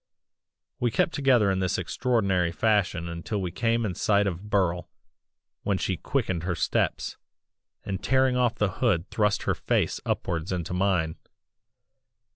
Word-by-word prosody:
"We 120 - +2
kept 140 - +1
together 125 -8 +3
in 95 - 0
this 95 0 0
extraordinary 100 -9 +1
fashion 95 -4 +1
until 85 +5 -4
we 90 -3 -3
came 115 +4 0
in 95 - -2
sight 100 +2 +2
of 100 +2 -4
Burle, 90 -4 +1 0.7
when 100 -1 0
she 95 - -1
quickened 95 - -1
her 85 0 -2
steps, - - -1 0.7
and 95 -1 -4
tearing 130 -1 +3
off 125 -2 +2
the 105 -2 0
hood 100 -8 +2
thrust 105 -2 +1
her - - +1
face - - 0
upwards 85 +1 -2
into 90 -1 -3
mine. 90 -4 +1
100 Hz, 145 wpm, -26 LUFS, 90-115 Hz, 0.7 s, together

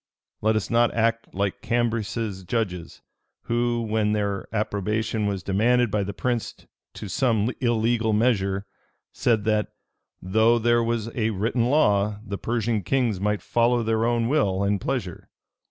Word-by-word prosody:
Let 110 +1 +2
us 110 +1 -2
not 120 0 +3
act 115 0 0
like 100 0 -2
Cambyses's 115 -4 -1
judges, 90 -6 -3 0.4
who, 120 0 0
when 110 -1 0
their 100 -2 -2
approbation 105 0 -1
was 100 -3 -3
demanded 120 +4 +2
by 105 - +1
the 100 +1 -3
prince 120 +2 -2 0.4
to 105 - -7
some 115 -1 +1
illegal 115 -1 +1
measure, 100 -3 +1 0.5
said, 115 -4 +1
that 105 0 +1 0.5
'Though 110 +5 +3
there 120 +1 +2
was 115 -1 -2
a 110 -2 +1
written 115 +3 0
law, 105 -7 +2
the 100 -1 -5
Persian 115 -2 -1
kings 115 0 0
might 105 +1 -1
follow 120 0 +2
their 110 0 0
own 115 0 +1
will 100 -9 +1
and 100 -1 0
pleasure. - - -4
110 Hz, 145 wpm, -24 LUFS, 100-120 Hz, 0.5 s, not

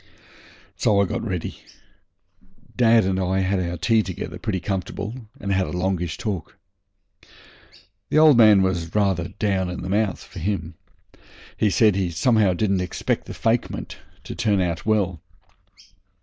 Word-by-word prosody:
So 100 -2 +2
I 100 - +4
got - - -3
ready. 90 -7 -4 1.2
Dad 115 -2 +5
and 95 0 0
I 95 +1 0
had 95 +1 0
our 85 -1 -3
tea 110 +7 +3
together 95 -4 -6
pretty 100 -4 -2
comfortable, 105 +5 -5
and 100 -1 -2
had 95 -1 +1
a - - -6
longish 90 -2 -2
talk. 100 -9 -5 1.5
The - - +1
old 155 -2 +7
man 105 -4 +6
was 85 -2 -2
rather 95 -5 +1
down 95 -2 -1
in 90 - -5
the 95 - -5
mouth 105 0 0
for - - -10
him. 85 -2 -3 0.8
He 105 - +2
said 105 0 +4
he 95 -2 0
somehow 100 +3 +2
didn't 100 -1 +1
expect 90 - -2
the - - -8
fakement 115 +1 -1 0.3
to - - -7
turn 105 -3 +1
out 85 0 -2
well. 95 -6 +1
95 Hz, 150 wpm, -23 LUFS, 90-105 Hz, 1.5 s, old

